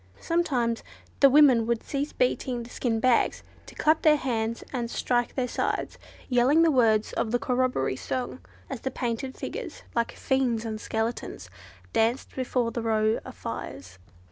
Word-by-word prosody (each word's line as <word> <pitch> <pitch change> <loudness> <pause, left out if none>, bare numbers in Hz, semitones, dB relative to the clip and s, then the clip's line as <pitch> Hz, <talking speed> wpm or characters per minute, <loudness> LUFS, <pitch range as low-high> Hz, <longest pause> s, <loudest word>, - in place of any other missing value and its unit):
Sometimes 255 -9 0 0.4
the 275 - +8
women 265 -5 +6
would 235 -1 0
cease 285 +1 -3
beating 255 - 0
the 235 - -12
skin 230 -3 -1
bags, 250 +1 +2 0.2
to - - -12
clap 310 +1 +3
their 310 -1 +6
hands 230 -5 -2
and 240 -3 -2
strike 240 0 0
their 255 -2 0
sides, - - -2 0.3
yelling 260 +6 +4
the 330 - +4
words 225 -5 +3
of - - -1
the 245 - +2
corroboree 250 - 0
song 255 - -4 0.3
as 265 -4 -6
the 265 - -2
painted 250 +1 -3
figures, - - -6
like 235 -1 0
fiends 250 -4 0
and 220 -1 -4
skeletons, 225 +2 -3 0.4
danced 230 +3 +1
before 250 -2 0
the 235 - -3
row 220 -1 +1
of - - -10
fires. 90 0 -7
245 Hz, 160 wpm, -27 LUFS, 225-265 Hz, 0.4 s, the